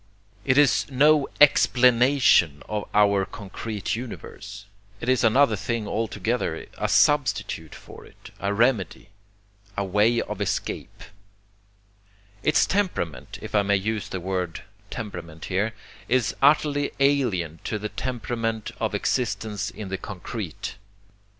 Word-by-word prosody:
It 130 -1 +3
is 145 -2 +4
no 145 +2 +4
EXPLANATION 125 - +5
of 105 -1 -4
our 100 -2 +4
concrete 105 +1 -5
universe, 115 -4 -8 0.3
it - - -6
is 130 -1 +3
another 115 +1 +4
thing 105 +2 -3
altogether, 110 -4 -2
a 105 - 0
substitute 125 - +2
for - - -13
it, - - -15
a 100 - -1
remedy, 110 -2 0 0.7
a 100 - 0
way 105 +5 +3
of - - -4
escape. - - -3 1.4
Its 150 - +3
temperament, 185 - -2
if - - -8
I 105 - +4
may 100 0 +2
use 110 +2 -3
the 95 - -4
word 90 -2 -3 0.3
temperament 85 -7 -7
here, 105 +4 +1 0.4
is 125 -4 +1
utterly 145 0 +3
alien 110 - +1
to 110 - -2
the 105 +1 -4
temperament 115 -3 -3
of - - -1
existence 105 -5 -1
in 105 -3 -8
the 95 0 -3
concrete. 95 -1 -6
110 Hz, 125 wpm, -25 LUFS, 100-130 Hz, 1.4 s, EXPLANATION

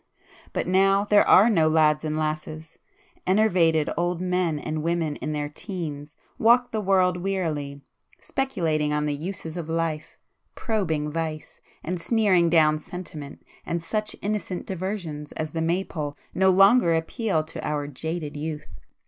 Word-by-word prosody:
But - - -2
now 195 +2 +3
there 205 0 +4
are 205 - +7
no 165 -9 +3
lads 155 -1 +3
and 155 0 -2
lasses,—enervated 165 - -1
old 175 0 -1
men 180 -3 0
and 155 +1 -3
women 165 -2 -1
in 155 - -4
their 150 -1 -2
teens 150 -3 -6 0.2
walk 240 +2 +4
the 220 - -1
world 185 -2 +3
wearily, 160 -7 -3 0.4
speculating 160 - -1
on 150 0 0
the 150 - 0
uses 165 +1 -6
of 165 -2 -5
life,—probing 160 +1 -3
vice, 160 -1 -5 0.2
and 175 +1 -3
sneering 190 -6 +3
down 155 -2 +4
sentiment, 155 -4 -8 0.2
and 170 0 -3
such 215 +4 -2
innocent 205 -3 -3
diversions 180 -6 -5
as 155 -1 -4
the 165 - -3
Maypole 160 -3 -2 0.2
no 190 +1 +3
longer 195 -1 +5
appeal 165 +1 -1
to 155 - -8
our 150 -1 -2
jaded 150 +2 -5
youth. 150 - -6
165 Hz, 140 wpm, -25 LUFS, 155-190 Hz, 0.4 s, are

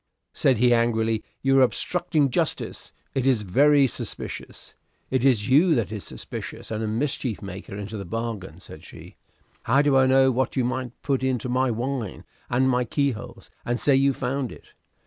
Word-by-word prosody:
Said 130 -3 +2
he 120 +2 +4
angrily, 115 -2 +1 0.2
"You 135 0 +4
are - - +6
obstructing 155 +2 +1
justice. - - -2 0.2
It 135 -1 0
is 125 -6 +3
very 140 +9 +4
suspicious." 130 - -6 0.4
"It 130 -2 +1
is 120 -6 +3
you 155 +6 +5
that 115 -4 -1
is 105 -3 -5
suspicious, - - -8
and 110 0 -2
a - - -1
mischief 120 0 -2
maker 100 0 -8
into 105 +2 -6
the 100 - -5
bargain," 115 -1 -5
said - - -12
she. - - -12 0.5
"How 140 +2 +3
do 145 -2 +3
I 130 0 +5
know 130 0 +5
what 130 0 -1
you 130 - +1
might 125 -1 -4
put 135 -2 0
into 130 -2 -1
my 130 +1 +1
wine 120 -2 -3 0.3
and 130 +2 +2
my 125 -1 +2
keyholes, 130 -1 -3
and 120 0 -1
say 140 - +3
you 135 +1 +4
found 130 -1 -3
it? - - -14
125 Hz, 180 wpm, -24 LUFS, 115-135 Hz, 0.5 s, are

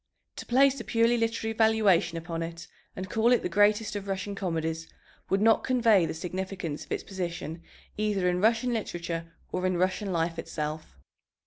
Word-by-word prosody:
To - - -7
place 270 +2 +4
a - - -5
purely 230 +3 +3
literary 225 -1 -1
valuation 210 -6 +3
upon 165 0 -4
it 165 0 -6 0.3
and 185 +1 -5
call 225 +5 +2
it 245 - +3
the - - 0
greatest 210 +3 +3
of 200 -1 -5
Russian 195 +1 -3
comedies 165 -4 -3 0.4
would 195 +1 +2
not 225 0 +4
convey 230 -9 +4
the - - -4
significance 185 -2 -4
of - - -19
its - - -2
position 170 -3 -5 0.4
either 205 -3 +1
in 180 0 +1
Russian 230 +3 +3
literature 170 -6 -4 0.2
or 185 0 0
in 185 -1 0
Russian 190 +2 0
life 165 -1 -1
itself. 155 - -5
190 Hz, 175 wpm, -28 LUFS, 170-220 Hz, 0.4 s, place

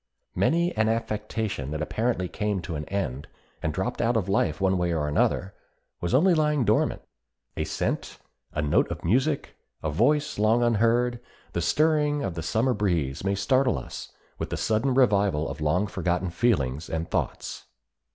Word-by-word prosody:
Many 170 +2 +1
an 110 0 +2
affection 105 - -2
that 75 +1 -3
apparently 110 0 -1
came 105 +1 -2
to 85 - -5
an 75 -1 -4
end, 70 -9 -3 0.3
and 80 - -1
dropped 95 +9 -2
out 115 0 +2
of 100 -4 -1
life 80 -5 +1
one 95 -1 +2
way 90 -1 +1
or 75 -3 0
another, 90 +5 +1 0.5
was 85 +7 0
only 180 +7 +5
lying 150 -5 +2
dormant. 105 +1 +1 0.5
A - - -1
scent, - - -2 0.3
a 75 - -2
note 75 - +2
of 85 +1 -6
music, 135 - +1 0.3
a 75 - -1
voice 145 - +1
long 110 +3 +3
unheard, 120 +1 +2 0.3
the 85 - -1
stirring 150 - +2
of 95 - -2
the 85 - -4
Summer 115 +10 +1
breeze 85 - -1
may 100 +1 +1
startle 125 +5 +2
us 60 - -7 0.3
with - - -3
the - - -3
sudden 120 +4 +1
revival 100 - +3
of 80 - -6
long 85 +7 +2
forgotten 90 -2 -1
feelings 80 - 0
and 80 +1 -2
thoughts. - - -3
100 Hz, 170 wpm, -26 LUFS, 85-120 Hz, 0.5 s, only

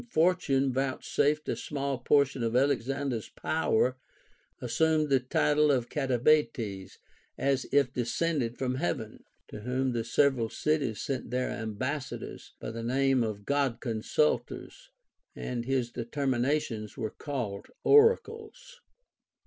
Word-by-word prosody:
501 160 - +3
Fortune 135 -7 0
vouchsafed 140 +3 0
a - - 0
small 140 -2 -3
portion 135 0 +2
of 115 0 -1
Alexander's 135 -2 0
power, 130 -5 0 0.6
assumed 155 +5 +1
the 135 -1 +4
title 150 +4 +2
of 125 -3 0
Kataibates 125 -7 +1 0.4
(as 135 -1 0
if 140 -3 +3
descended 125 0 -1
from 130 -1 -1
heaven), 130 -6 -3 0.3
to - - -8
whom 130 +4 -1
the 115 -2 -1
several 120 -1 +2
cities 145 -7 -1
sent 130 -4 -3
their 125 +1 -1
ambassadors, 125 +5 -5
by - - -5
the 115 0 -6
name 130 +2 +2
of 105 -3 -3
God 140 -5 0
consulters, 150 - -1 0.5
and 120 -1 -4
his 130 -2 0
determinations 125 -2 -1
were 110 -4 -3
called 120 -9 -5 0.2
oracles. 455 +2 +2
130 Hz, 120 wpm, -29 LUFS, 120-145 Hz, 0.6 s, the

